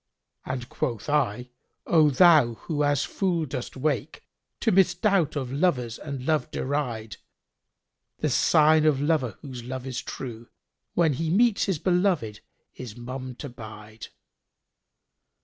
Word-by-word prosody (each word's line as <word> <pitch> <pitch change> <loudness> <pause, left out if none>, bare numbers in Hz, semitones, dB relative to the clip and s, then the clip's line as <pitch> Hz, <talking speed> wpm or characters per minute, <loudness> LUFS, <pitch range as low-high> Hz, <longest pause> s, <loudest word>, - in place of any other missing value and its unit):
And 125 -2 -4
quoth 125 -5 -3
I, 125 -4 0 0.3
'O 155 -3 +5
thou 145 -5 +5
who 150 +4 -3
as 145 -1 +2
fool 175 -3 -1
dost 130 -2 -6
wake, 135 -4 -2 0.2
* - - -57
To - - +2
misdoubt 185 -2 +2
of 130 -4 -3
lovers 135 -8 0
and 140 -4 -6
Love 155 0 +1
deride; 125 -6 -3 1.0
The - - -1
sign 155 0 +4
of 145 -3 +3
lover 145 - 0
whose 125 -4 -8
love 130 +1 -6
is 130 -2 -4
true 115 -3 -7 0.2
* - - -56
When 165 -4 +3
he 160 +4 -2
meets 215 +4 +3
his 190 -5 0
belovиd 175 - 0 0.3
is 125 -3 -9
mum 130 +1 -6
to 145 - -7
bide.'" 110 -2 -10
140 Hz, 140 wpm, -26 LUFS, 125-160 Hz, 1.0 s, O